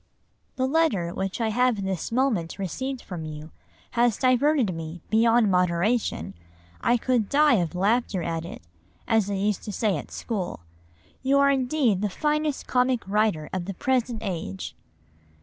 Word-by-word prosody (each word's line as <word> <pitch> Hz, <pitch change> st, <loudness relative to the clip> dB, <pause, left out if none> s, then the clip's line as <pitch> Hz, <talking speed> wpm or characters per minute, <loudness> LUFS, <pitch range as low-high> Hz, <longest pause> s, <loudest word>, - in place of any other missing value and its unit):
"The 260 Hz, -, 0 dB
letter 260 Hz, -, +1 dB
which 190 Hz, +2 st, -3 dB
I 225 Hz, -1 st, +1 dB
have 240 Hz, -2 st, +1 dB
this 190 Hz, 0 st, -3 dB
moment 230 Hz, -9 st, 0 dB
received 260 Hz, +8 st, -4 dB
from 175 Hz, -4 st, -6 dB
you 155 Hz, 0 st, -8 dB, 0.4 s
has 240 Hz, -3 st, +2 dB
diverted 255 Hz, -4 st, +3 dB
me 165 Hz, +1 st, -6 dB
beyond 225 Hz, -1 st, +4 dB
moderation. 180 Hz, -, +1 dB, 0.5 s
I 240 Hz, -, +3 dB
could 240 Hz, -3 st, 0 dB
die 295 Hz, -3 st, +5 dB
of 175 Hz, -2 st, -1 dB
laughter 200 Hz, -1 st, +1 dB
at 165 Hz, -1 st, -2 dB
it, 170 Hz, -, -9 dB, 0.4 s
as 220 Hz, -3 st, +2 dB
they 200 Hz, -1 st, -2 dB
used 205 Hz, 0 st, 0 dB
to 210 Hz, -, -4 dB
say 205 Hz, -3 st, 0 dB
at -, -, -8 dB
school. 195 Hz, -, -4 dB, 0.6 s
You 270 Hz, +1 st, +3 dB
are 280 Hz, 0 st, +5 dB
indeed 255 Hz, -6 st, +1 dB
the 210 Hz, -, 0 dB
finest 300 Hz, +5 st, -1 dB
comic 250 Hz, -4 st, +1 dB
writer 205 Hz, -7 st, +1 dB
of 185 Hz, -2 st, -2 dB
the 195 Hz, 0 st, -5 dB
present 245 Hz, -1 st, 0 dB
age." 160 Hz, -, -4 dB
215 Hz, 155 wpm, -25 LUFS, 180-255 Hz, 0.6 s, die